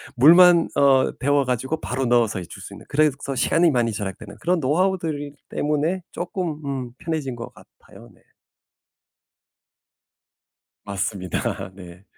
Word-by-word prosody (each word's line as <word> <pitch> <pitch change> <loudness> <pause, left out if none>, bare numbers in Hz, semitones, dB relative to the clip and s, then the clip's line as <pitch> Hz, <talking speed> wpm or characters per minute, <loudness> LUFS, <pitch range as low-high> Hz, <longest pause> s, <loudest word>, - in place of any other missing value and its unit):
물만 170 +5 +7
어 135 -2 +4
데워 145 +1 +2
가지고 130 +5 -2
바로 130 +2 -2
넣어서 120 -4 +2
해 90 - -7
줄 - - -12
수 - - -10
있는 - - -12
그래서 155 +1 +3 0.2
시간이 165 +5 +3
많이 120 -3 +1
절약되는 100 +1 -6
그런 180 +1 +1
노하우들 155 -1 0 0.2
때문에 150 +5 -1
쪼끔 175 -3 -4
음 130 -3 -4
편해진 155 -6 -3
것 115 -1 -8
같아요. - - -17
네. - - -26 2.6
맞습니다. 95 -1 -3
네. 90 -1 -13
140 Hz, 270 characters per minute, -23 LUFS, 115-160 Hz, 2.6 s, 물만